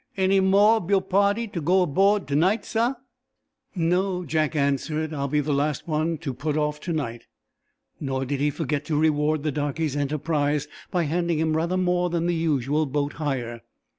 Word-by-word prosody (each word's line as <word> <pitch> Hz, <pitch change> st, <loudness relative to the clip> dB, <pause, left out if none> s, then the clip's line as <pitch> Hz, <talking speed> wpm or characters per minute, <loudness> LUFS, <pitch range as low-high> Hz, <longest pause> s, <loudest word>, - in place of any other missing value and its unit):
"Any 190 Hz, +1 st, +3 dB
mo' 200 Hz, +4 st, +5 dB
ob 190 Hz, -5 st, -6 dB
yo' 200 Hz, -1 st, +4 dB
pahty 200 Hz, +4 st, +1 dB
to 170 Hz, -, -3 dB
go 185 Hz, +4 st, +3 dB
abo'd 195 Hz, +6 st, +2 dB
to 140 Hz, -, 0 dB
night, 185 Hz, +9 st, +2 dB
sah?" 235 Hz, +4 st, 0 dB, 0.8 s
"No," 180 Hz, +1 st, 0 dB
Jack 155 Hz, 0 st, 0 dB
answered. 150 Hz, +2 st, 0 dB
"I'll 140 Hz, -2 st, -2 dB
be 150 Hz, +2 st, +1 dB
the 145 Hz, 0 st, -1 dB
last 145 Hz, +2 st, -1 dB
one 160 Hz, +1 st, 0 dB
to 135 Hz, -, -2 dB
put 145 Hz, +4 st, -2 dB
off 150 Hz, 0 st, -1 dB
to 175 Hz, -, -5 dB
night." 120 Hz, -7 st, -4 dB, 0.7 s
Nor 135 Hz, -2 st, -2 dB
did 140 Hz, +1 st, -2 dB
he 145 Hz, +1 st, +2 dB
forget 150 Hz, -1 st, -2 dB
to 150 Hz, -1 st, -1 dB
reward 155 Hz, -1 st, +1 dB
the 155 Hz, -, 0 dB
darkey's 145 Hz, +1 st, -2 dB
enterprise 145 Hz, 0 st, 0 dB, 0.2 s
by 175 Hz, -2 st, 0 dB
handing 170 Hz, +2 st, 0 dB
him 160 Hz, 0 st, +1 dB
rather 170 Hz, +3 st, 0 dB
more 180 Hz, -1 st, +1 dB
than 170 Hz, -1 st, -1 dB
the 175 Hz, -, +1 dB
usual 150 Hz, -2 st, 0 dB
boat 145 Hz, +1 st, -1 dB
hire. 120 Hz, -5 st, -3 dB
155 Hz, 185 wpm, -25 LUFS, 145-180 Hz, 0.8 s, mo